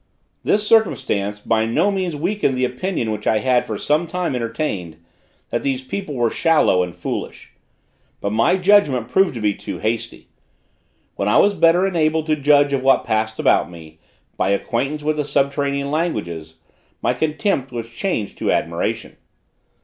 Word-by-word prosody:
This 210 0 +1
circumstance 105 - +1
by 110 +1 0
no 160 - +2
means 185 -5 -2
weakened 170 -3 0
the 130 - +2
opinion 125 - -2
which 105 -1 -4
I 110 - +3
had 125 +2 +2
for 110 - -3
some 155 +8 0
time 180 -2 -2
entertained, 115 - -3 0.5
that - - -1
these 135 -2 -2
people 150 +3 -5
were 120 -2 +1
shallow 160 - +3
and 90 -1 -4
foolish. - - -6 0.7
But 100 - -2
my 115 - +3
judgment 180 - +3
proved 190 -7 +2
to 115 - -5
be 105 -1 +2
too - - -7
hasty. 115 +1 -4 0.9
When 100 - -1
I 105 - +4
was 205 - +5
better 175 0 +4
enabled 160 -4 +1
to 155 -1 +1
judge 145 -1 +3
of 135 - +1
what 135 +1 +3
passed 110 0 -1
about 75 - +2
me, 80 -2 -13 0.4
by 95 - +1
acquaintance 135 +9 -1
with 155 0 0
the 150 - 0
subterranean 140 0 0
languages, 85 - -3 0.5
my 120 - +2
contempt 150 - -1
was 115 -2 -5
changed 115 - -3
to - - 0
admiration. - - -2
135 Hz, 165 wpm, -20 LUFS, 110-160 Hz, 0.9 s, was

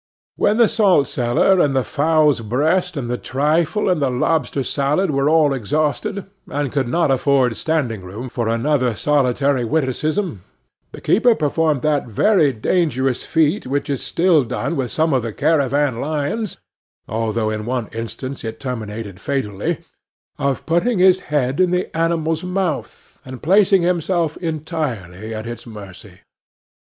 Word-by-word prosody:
When 210 - +2
the 235 -2 +6
salt 200 -10 +3
cellar, 125 +11 +2
and 140 -5 +2
the 130 - +2
fowl's 155 -2 +2
breast, 160 - 0
and 130 -4 -3
the 125 +1 -2
trifle, 155 +7 0
and 180 -5 +1
the 135 - +2
lobster 135 +1 0
salad 150 +8 0
were 140 +1 +1
all 155 -3 +4
exhausted, 150 - -1 0.2
and 145 -2 -2
could 135 -4 0
not 165 +2 +1
afford 130 -2 +2
standing 135 -10 -1
room 100 +8 -7
for 120 -2 -3
another 125 +1 +1
solitary 140 0 +1
witticism, 155 - -1 0.5
the - - -10
keeper 230 +3 +3
performed 155 - 0
that 150 -4 +1
very 155 - +3
dangerous 130 0 0
feat 160 +1 +1
which 140 +2 -2
is 135 - -2
still 170 -4 +2
done 125 +7 -3
with 130 -3 -2
some 160 -1 +1
of 130 - +2
the 115 -1 -4
caravan 140 -4 +1
lions, 155 +8 -2 0.5
although 110 0 -1
in 110 +1 -4
one 125 -3 -2
instance 120 +4 -6
it 115 0 -6
terminated 110 -6 -6
fatally, 105 -8 -2 0.6
of 140 -1 -1
putting 180 +8 +1
his 185 0 +5
head 140 -4 -1
in 185 -1 +4
the 180 -1 -2
animal's 165 -1 0
mouth, 180 -2 -4
and 130 -1 -10
placing 195 +2 +4
himself 170 -2 0
entirely 145 - -4
at 110 0 -5
its 120 +1 -7
mercy. 100 -3 -11
145 Hz, 150 wpm, -20 LUFS, 120-165 Hz, 0.6 s, the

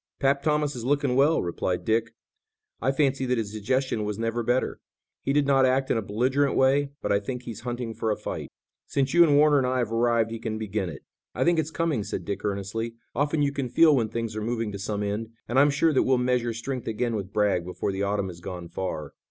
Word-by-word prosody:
"'Pap' 140 0 +2
Thomas 150 -1 +1
is 120 - -6
looking 140 0 +1
well," 145 +5 +4
replied 90 +1 -2
Dick. 115 0 0 0.7
"I 135 - +2
fancy 135 -1 +1
that 125 0 +1
his 110 -2 -3
digestion 115 +2 0
was 105 -1 -3
never 115 +1 -1
better. 120 +3 0 0.4
He - - -1
did 145 0 +3
not 135 -1 +4
act 130 +1 +2
in - - +2
a - - -2
belligerent 130 +7 +1
way, 135 +2 +3
but - - 0
I 100 - +4
think 125 +4 -5
he's 115 -3 -7
hunting 120 -1 -4
for 110 - -2
a 105 - 0
fight." - - -5 0.4
"Since 135 -1 0
you 175 0 +8
and 145 -4 +4
Warner 150 -1 +5
and 130 - +1
I 130 0 0
have 120 -3 -1
arrived 115 -1 +2
he 115 - -4
can 110 -1 -3
begin 105 -3 -2
it." 75 -5 -9 0.3
"I - - +1
think 170 -1 +3
it's 160 - -1
coming," 160 -8 -1
said - - -5
Dick 100 - -4
earnestly. 105 +3 -3 0.2
"Often 145 +1 +1
you 140 - +2
can 140 -3 -3
feel 155 +3 +6
when 115 -4 +1
things 115 -1 -3
are 110 - -3
moving 115 -1 -2
to 100 - -6
some 105 +1 -2
end, 110 +3 -3
and 125 +3 +2
I'm 145 +2 +6
sure 150 +3 +2
that 130 - +4
we'll 130 0 +3
measure 125 -1 +1
strength 120 +2 -5
again 115 +1 -1
with 100 -2 -4
Bragg 100 -4 +2
before 90 +3 -3
the 95 0 -3
autumn 100 -1 0
has 85 -1 -10
gone 90 -2 -7
far." 90 -5 -4
120 Hz, 240 wpm, -26 LUFS, 105-135 Hz, 0.7 s, you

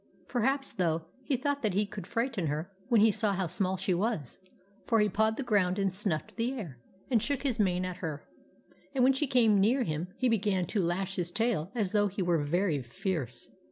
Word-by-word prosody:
Perhaps, 270 +3 +1
though, 165 -3 0 0.2
he 265 0 0
thought 285 +2 -1
that 210 -5 0
he 205 +1 +2
could 200 -3 -8
frighten 230 -7 -1
her 155 +6 -3 0.2
when 230 -4 +5
he 220 0 +6
saw 210 -1 +1
how 190 -1 0
small 185 +2 -1
she 185 0 0
was; 175 - -2 0.5
for 225 - +3
he 210 - +4
pawed 220 +3 +1
the 275 - -2
ground 200 -6 +2
and 195 -2 0
snuffed 190 -4 -3
the 240 +3 0
air, 170 - -7 0.3
and 230 -4 +4
shook 285 +2 -2
his 250 -5 0
mane 185 -3 +2
at 180 -1 -5
her, 155 -4 -5 0.7
and 255 - +3
when 265 +2 +6
she 275 +2 0
came 225 -6 +4
near 240 +7 +3
him 155 -3 -2
he 255 - +2
began 205 -5 +1
to 200 +4 -1
lash 185 +3 -1
his 175 -1 0
tail 210 -5 0
as 205 -6 0
though 205 -1 +3
he 195 0 -3
were 170 -4 +2
very 165 -1 +1
fierce. 125 - -4
200 Hz, 215 wpm, -30 LUFS, 175-230 Hz, 0.7 s, he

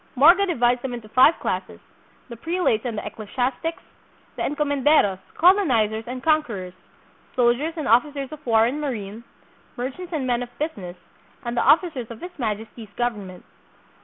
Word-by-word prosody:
Morga 345 +9 +6
divides 245 -7 +2
them 250 -1 -4
into 230 -3 -9
five 260 +8 +5
classes: - - -3 0.5
the 235 - -8
prelates 325 -4 0
and 235 -3 -3
ecclesi 210 0 -7
astics; 270 +6 -2 0.5
the - - -6
encomenderos, 285 -8 +2 0.2
colonizers, 245 - +3
and 250 +1 -6
conquerors; 240 - 0 0.6
sol 240 -2 +4
diers 315 +7 -4
and 310 - -3
officers 275 +3 +2
of 305 -1 -10
war 225 -2 +4
and 275 +6 -2
marine; 225 -6 -5 0.5
merchants 270 +9 -5
and 300 -6 -2
men 245 -1 0
of 245 - -5
business; 200 - -5 0.5
and 235 0 -3
the - - +2
officers 305 -9 +2
of 230 -1 -9
his 355 - -8
Majesty's 220 -1 -4
govern 230 -5 -2
ment. 180 -1 -12
245 Hz, 160 wpm, -23 LUFS, 225-300 Hz, 0.6 s, Morga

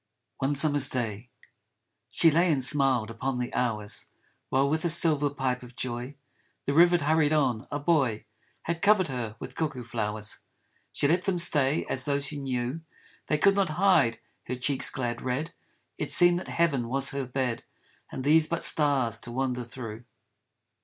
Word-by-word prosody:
66 135 - +2
ONE 145 - 0
SUMMER'S 145 -2 +3
DAY 115 -2 -4 0.8
SHE 165 - +4
lay 170 +3 +3
and 135 -4 +1
smiled 130 -5 +2
upon 130 +3 -3
the 125 0 -4
hours, 110 -4 -2 0.4
While 135 +1 +2
with 155 +3 0
his 170 0 +2
silver 150 -4 +2
pipe 130 -3 -2
of 125 -1 -13
joy 125 +2 -5 0.5
The 140 - 0
river 175 +3 +6
hurried 155 -1 +2
on; 130 -7 0
a 145 - -2
boy 140 -8 +1 0.4
Had 170 0 -3
covered 200 -5 +4
her 120 -5 -4
with 125 - -8
cuckoo 145 -4 -3
flowers. 105 -2 -3 0.5
She - - 0
let 175 +5 +1
them 190 -3 0
stay 150 -4 +3
as 130 - -2
though 140 -1 +1
she 140 +1 -3
knew 130 +2 -3 0.5
They 155 - +1
could 195 +6 +4
not 195 -3 +1
hide 180 -12 +3 0.3
her 125 - -2
cheek's 130 +2 -1
glad 120 -3 -3
red, 135 +6 -3 0.5
It - - -3
seemed 175 0 +5
that - - -9
heaven 140 -8 0
was 135 +2 0
her 135 -2 -3
bed 125 -2 -2 0.5
And 130 - -5
these 155 +2 +4
but 170 - -2
stars 140 -7 +3
to 120 - -8
wander 125 0 -2
through. 115 -1 -8
135 Hz, 175 wpm, -27 LUFS, 125-155 Hz, 0.8 s, river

